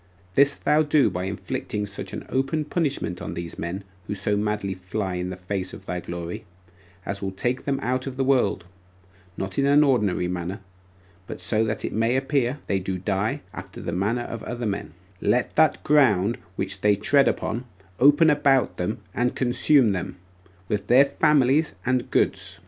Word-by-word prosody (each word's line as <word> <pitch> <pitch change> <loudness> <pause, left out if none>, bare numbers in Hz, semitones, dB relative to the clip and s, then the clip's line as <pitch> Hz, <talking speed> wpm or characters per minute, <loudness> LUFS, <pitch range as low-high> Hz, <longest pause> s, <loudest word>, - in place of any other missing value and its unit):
This 140 +6 +4
thou 150 +1 +2
do 145 -7 +3
by 90 +1 -3
inflicting 105 +1 -3
such 100 -2 -7
an - - -6
open 135 +4 0
punishment 140 - -2
on - - -5
these 85 -1 -6
men 90 +4 -4 0.2
who 105 - -3
so 105 +1 0
madly 105 -1 -1
fly 95 +1 -4
in 90 0 -3
the 90 - -5
face 95 0 -4
of 95 - -13
thy 90 -1 -3
glory, 85 0 -6 0.6
as 100 0 -4
will 95 - -2
take 120 +7 -2
them 140 -1 0
out 130 +1 -1
of 130 -1 -6
the 135 - +1
world, 125 -9 +2 0.7
not 95 +3 -3
in 140 - +3
an 145 +1 +6 0.5
manner, 90 +3 -4 0.7
but - - -7
so 110 +5 +1
that 110 0 -2
it - - -4
may 115 +3 +1
appear 135 -1 0
they 100 - 0
do 95 0 -3
die 95 +3 -1
after - - -9
the 85 - -4
manner 105 +7 0
of 115 -2 -6
other 120 -1 -4
men: 100 -6 -3 0.3
let 125 - +1
that 155 0 +3
ground 120 -8 +3 0.2
which 95 0 -3
they 105 -1 +4
tread 135 +8 +3
upon 115 +3 -1 0.3
open 145 +4 +6
about 140 -3 +2
them 95 +5 -2
and 125 +1 0
consume 125 -1 +3
them, 95 0 -3 0.5
with 105 -1 -2
their 130 +3 +7
families 145 -2 +2
and 125 -1 0
goods. - - 0
110 Hz, 175 wpm, -24 LUFS, 95-135 Hz, 0.7 s, their